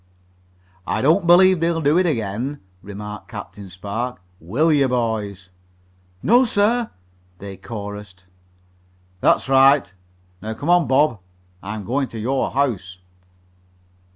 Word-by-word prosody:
"I -, -, -1 dB
don't 170 Hz, +5 st, +3 dB
believe 185 Hz, +1 st, +6 dB
they'll 165 Hz, 0 st, 0 dB
do 155 Hz, +2 st, +3 dB
it 185 Hz, -, +2 dB
again," 120 Hz, +1 st, -3 dB, 0.2 s
remarked 105 Hz, +1 st, -8 dB
Captain 100 Hz, -2 st, -9 dB
Spark. 100 Hz, +5 st, -5 dB, 0.2 s
"Will 135 Hz, -, +1 dB
you, 140 Hz, -2 st, +3 dB
boys?" 105 Hz, -6 st, -3 dB, 0.7 s
"No, 240 Hz, +5 st, +5 dB
sir," 230 Hz, +1 st, +1 dB, 0.5 s
they 100 Hz, +1 st, -8 dB
chorused. 105 Hz, -3 st, -8 dB, 1.0 s
"That's -, -, +2 dB
right. 135 Hz, -5 st, +4 dB, 0.5 s
Now 110 Hz, +1 st, -5 dB
come 145 Hz, +9 st, -1 dB
on, 175 Hz, -3 st, +4 dB
Bob. 135 Hz, -4 st, +2 dB, 0.4 s
I'm 105 Hz, +1 st, -6 dB
going 135 Hz, +4 st, -1 dB
to 115 Hz, -, -8 dB
your 130 Hz, +5 st, -1 dB
house." 105 Hz, -10 st, -2 dB
125 Hz, 120 wpm, -21 LUFS, 105-155 Hz, 1.0 s, believe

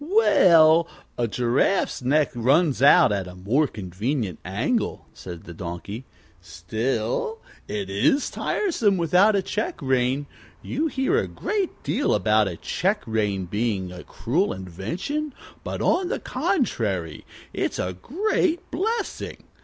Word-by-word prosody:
"Well, 170 Hz, -, +5 dB, 0.3 s
a 120 Hz, -, 0 dB
giraffe's 125 Hz, -, +1 dB
neck 145 Hz, +4 st, +2 dB
runs 135 Hz, +5 st, +2 dB
out 145 Hz, -1 st, +7 dB
at 100 Hz, -3 st, -1 dB
a 90 Hz, -, -10 dB
more 115 Hz, +12 st, +1 dB
convenient 105 Hz, -, -3 dB
angle," 120 Hz, -, -1 dB
said 85 Hz, -3 st, -9 dB
the 85 Hz, -, -10 dB
Donkey. 90 Hz, +8 st, -6 dB, 0.4 s
"Still, 110 Hz, -, -2 dB, 0.3 s
it 100 Hz, -2 st, -3 dB
is 110 Hz, -, +1 dB
tiresome 230 Hz, -, 0 dB
without 180 Hz, +5 st, +4 dB
a 195 Hz, -, +1 dB
check 215 Hz, +4 st, -3 dB
rein. 130 Hz, 0 st, +1 dB, 0.4 s
You 310 Hz, +5 st, -1 dB
hear 275 Hz, +9 st, +1 dB
a -, -, -2 dB
great 405 Hz, -4 st, -3 dB
deal 290 Hz, -, +1 dB
about 105 Hz, +1 st, +3 dB
a 85 Hz, -3 st, -5 dB
check 195 Hz, -, -1 dB
rein 105 Hz, -4 st, -1 dB
being 100 Hz, -1 st, -2 dB
a 90 Hz, 0 st, -9 dB
cruel 170 Hz, -, -1 dB
invention, 165 Hz, -, -4 dB, 0.3 s
but, -, -, -4 dB
on 365 Hz, -1 st, +2 dB
the -, -, -1 dB
contrary, 100 Hz, -, -1 dB, 0.3 s
it's -, -, -2 dB
a 90 Hz, -, -2 dB
great 350 Hz, -, -1 dB
blessing. 440 Hz, +5 st, -3 dB
130 Hz, 130 wpm, -24 LUFS, -, 0.4 s, out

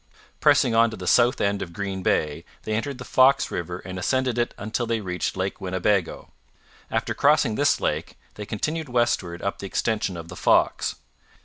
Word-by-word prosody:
Pressing 120 Hz, -, +4 dB
on 115 Hz, +1 st, +5 dB
to 110 Hz, -, -8 dB
the 90 Hz, -, -7 dB
south 120 Hz, +6 st, +4 dB
end 100 Hz, 0 st, 0 dB
of 85 Hz, -, -6 dB
Green 100 Hz, -1 st, -4 dB
Bay, 75 Hz, -4 st, 0 dB, 0.2 s
they 110 Hz, -, -3 dB
entered 125 Hz, +5 st, -2 dB
the 125 Hz, -, -8 dB
Fox 135 Hz, +2 st, +4 dB
river 85 Hz, +1 st, -4 dB
and 95 Hz, 0 st, -5 dB
ascended 130 Hz, +4 st, 0 dB
it 120 Hz, -, -1 dB
until 110 Hz, +3 st, -3 dB
they 115 Hz, 0 st, 0 dB
reached 90 Hz, -2 st, -3 dB
Lake 95 Hz, +1 st, -3 dB
Winnebago. 95 Hz, 0 st, -1 dB, 0.6 s
After -, -, -1 dB
crossing -, -, +3 dB
this -, -, +2 dB
lake -, -, -2 dB, 0.2 s
they 105 Hz, -1 st, -8 dB
continued 155 Hz, +7 st, -3 dB
westward 115 Hz, -8 st, 0 dB
up 100 Hz, -, -2 dB
the 100 Hz, -, -5 dB
extension 105 Hz, -3 st, -1 dB
of 85 Hz, 0 st, -8 dB
the 90 Hz, -, -9 dB
Fox. -, -, +2 dB
105 Hz, 185 wpm, -24 LUFS, 90-120 Hz, 0.6 s, on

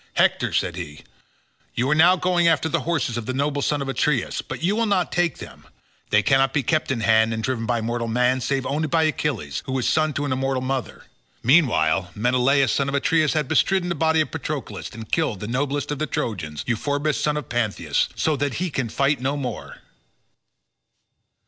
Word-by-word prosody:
"Hector," -, -, +2 dB
said 85 Hz, 0 st, -1 dB
he, 75 Hz, -4 st, -8 dB, 0.7 s
"you 125 Hz, -, 0 dB
are -, -, +6 dB
now 160 Hz, +4 st, +6 dB
going 180 Hz, -1 st, +2 dB
after 160 Hz, -1 st, +3 dB
the 165 Hz, +1 st, 0 dB
horses 155 Hz, -9 st, -1 dB
of 115 Hz, -, -5 dB
the 130 Hz, -, -2 dB
noble 145 Hz, +1 st, 0 dB
son 145 Hz, 0 st, 0 dB
of -, -, -7 dB
Aeacus, 135 Hz, -1 st, 0 dB
but -, -, -7 dB
you 195 Hz, +4 st, +2 dB
will 230 Hz, 0 st, +1 dB
not 195 Hz, -3 st, +1 dB
take 175 Hz, -1 st, 0 dB
them; -, -, -11 dB, 0.5 s
they 105 Hz, 0 st, +3 dB
cannot 135 Hz, -1 st, +3 dB
be 145 Hz, -, +2 dB
kept 155 Hz, +6 st, 0 dB
in 125 Hz, -4 st, -1 dB
hand 110 Hz, 0 st, +3 dB
and 110 Hz, -, -4 dB
driven 115 Hz, -3 st, -2 dB
by 120 Hz, -2 st, 0 dB
mortal 115 Hz, +1 st, -2 dB
man, 125 Hz, +3 st, +1 dB
save 135 Hz, +1 st, -1 dB
only 155 Hz, +3 st, -1 dB
by 160 Hz, +1 st, +2 dB
Achilles, 135 Hz, -, -2 dB
who 130 Hz, 0 st, -1 dB
is 125 Hz, -, -1 dB
son 155 Hz, 0 st, +2 dB
to 145 Hz, +1 st, -2 dB
an 140 Hz, -, -2 dB
immortal 130 Hz, 0 st, -1 dB
mother. 130 Hz, -1 st, -3 dB, 0.4 s
Meanwhile 95 Hz, -, +3 dB
Menelaus 125 Hz, +3 st, +2 dB
son 140 Hz, 0 st, 0 dB
of 140 Hz, -, -2 dB
Atreus 155 Hz, +1 st, +2 dB
has 155 Hz, -2 st, 0 dB
bestridden 185 Hz, +6 st, +1 dB
the -, -, 0 dB
body 160 Hz, 0 st, +2 dB
of 155 Hz, -, -3 dB
Patroclus -, -, -5 dB
and 110 Hz, -1 st, -10 dB
killed 155 Hz, -, 0 dB
the 105 Hz, -, -5 dB
noblest 140 Hz, +4 st, -2 dB
of 145 Hz, -, -3 dB
the 155 Hz, -, -1 dB
Trojans, 80 Hz, -, -3 dB
Euphorbus 145 Hz, +5 st, -1 dB
son 150 Hz, 0 st, 0 dB
of 150 Hz, -, -5 dB
Panthous, 105 Hz, -11 st, 0 dB
so 155 Hz, -, +1 dB
that 140 Hz, -3 st, -2 dB
he 180 Hz, 0 st, -2 dB
can 130 Hz, -5 st, -2 dB
fight 140 Hz, +2 st, +1 dB
no 135 Hz, +3 st, -1 dB
more." 125 Hz, -5 st, -6 dB
135 Hz, 205 wpm, -23 LUFS, 120-155 Hz, 0.7 s, are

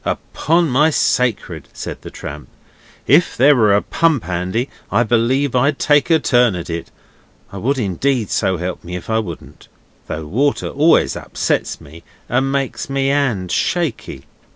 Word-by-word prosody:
'Upon 165 Hz, +2 st, 0 dB
my 145 Hz, +4 st, +3 dB
sacred,' 115 Hz, -, 0 dB
said -, -, -7 dB
the -, -, -9 dB
tramp, 75 Hz, +1 st, -9 dB, 0.6 s
'if -, -, +3 dB
there 140 Hz, +4 st, +6 dB
was 105 Hz, -5 st, +4 dB
a -, -, +1 dB
pump 160 Hz, -, +1 dB
handy 90 Hz, +8 st, -2 dB, 0.2 s
I -, -, +3 dB
believe 120 Hz, +4 st, +1 dB
I'd 140 Hz, +3 st, +2 dB
take 145 Hz, +1 st, +2 dB
a 165 Hz, -, +5 dB
turn 120 Hz, -7 st, +2 dB
at 85 Hz, -1 st, -6 dB
it 85 Hz, 0 st, -5 dB, 0.6 s
I 100 Hz, -, -8 dB
would 135 Hz, +8 st, 0 dB
indeed, 120 Hz, +2 st, -1 dB
so 95 Hz, -1 st, +1 dB
help 90 Hz, +2 st, -5 dB
me 90 Hz, +1 st, -6 dB
if 90 Hz, +5 st, -6 dB
I 110 Hz, -, +2 dB
wouldn't! 85 Hz, -7 st, -8 dB, 0.4 s
Though 80 Hz, 0 st, -5 dB
water 135 Hz, -, 0 dB
always 155 Hz, +4 st, +3 dB
upsets -, -, -2 dB
me 80 Hz, +4 st, -14 dB, 0.3 s
and 130 Hz, +2 st, 0 dB
makes 140 Hz, 0 st, -2 dB
my 135 Hz, 0 st, -1 dB
'and 135 Hz, -10 st, 0 dB
shaky. 135 Hz, -, -2 dB
120 Hz, 160 wpm, -18 LUFS, 90-140 Hz, 0.6 s, there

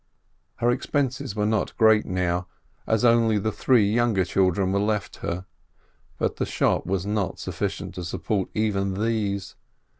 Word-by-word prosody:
Her 120 Hz, 0 st, +2 dB
expenses 130 Hz, -3 st, -1 dB
were 105 Hz, -1 st, 0 dB
not 110 Hz, -1 st, -1 dB
great 110 Hz, -1 st, +5 dB
now, 90 Hz, -1 st, -1 dB, 0.4 s
as 110 Hz, +2 st, +2 dB
only 115 Hz, -2 st, +4 dB
the 110 Hz, +2 st, -1 dB
three 115 Hz, -2 st, +3 dB
younger 110 Hz, -3 st, +2 dB
children 95 Hz, +1 st, +1 dB
were 100 Hz, -, +1 dB
left 105 Hz, 0 st, -1 dB
her, 90 Hz, +2 st, -4 dB, 0.7 s
but -, -, -1 dB
the -, -, 0 dB
shop -, -, +1 dB
was 95 Hz, -1 st, -1 dB
not 105 Hz, -2 st, -1 dB
sufficient -, -, -4 dB
to 90 Hz, -, -6 dB
support 95 Hz, +3 st, -2 dB
even 100 Hz, -3 st, 0 dB
these. 105 Hz, -3 st, -1 dB
105 Hz, 150 wpm, -25 LUFS, 95-110 Hz, 0.7 s, great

